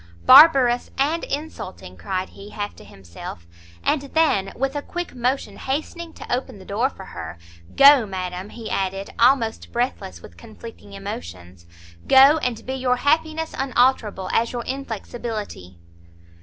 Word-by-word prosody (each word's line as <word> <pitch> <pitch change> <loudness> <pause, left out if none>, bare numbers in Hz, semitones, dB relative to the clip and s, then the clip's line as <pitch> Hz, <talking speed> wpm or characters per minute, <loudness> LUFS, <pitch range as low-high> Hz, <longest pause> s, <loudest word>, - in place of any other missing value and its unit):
"Barbarous, 265 - +7
and 300 +5 0
insulting!" 275 - -6
cried 185 - -4
he, 200 +1 -12
half 205 -1 -5
to - - -13
himself; 85 -2 -11 0.4
and 300 - +1
then, 280 -9 +1
with 270 +2 -2
a 290 - -2
quick 350 +4 -6
motion 255 +2 -2
hastening 320 +5 -4
to - - -3
open 255 -2 -6
the 190 - -14
door 225 +8 0
for 190 - -12
her, 85 - -8 0.4
"Go, 275 -5 +7
madam," 185 0 -5
he 230 -1 -9
added, 195 0 -3
almost 235 -2 +2
breathless 235 - -3
with 85 0 -15
conflicting 205 - -12
emotions, 95 - -8 0.4
"go, 275 +4 +7
and 250 -6 -3
be 260 - -4
your 255 -1 +1
happiness 315 +4 0
unalterable 245 -7 +1
as 230 +1 +1
your 240 -1 -4
inflexibility!" 225 - -6
240 Hz, 140 wpm, -22 LUFS, 195-275 Hz, 0.4 s, Barbarous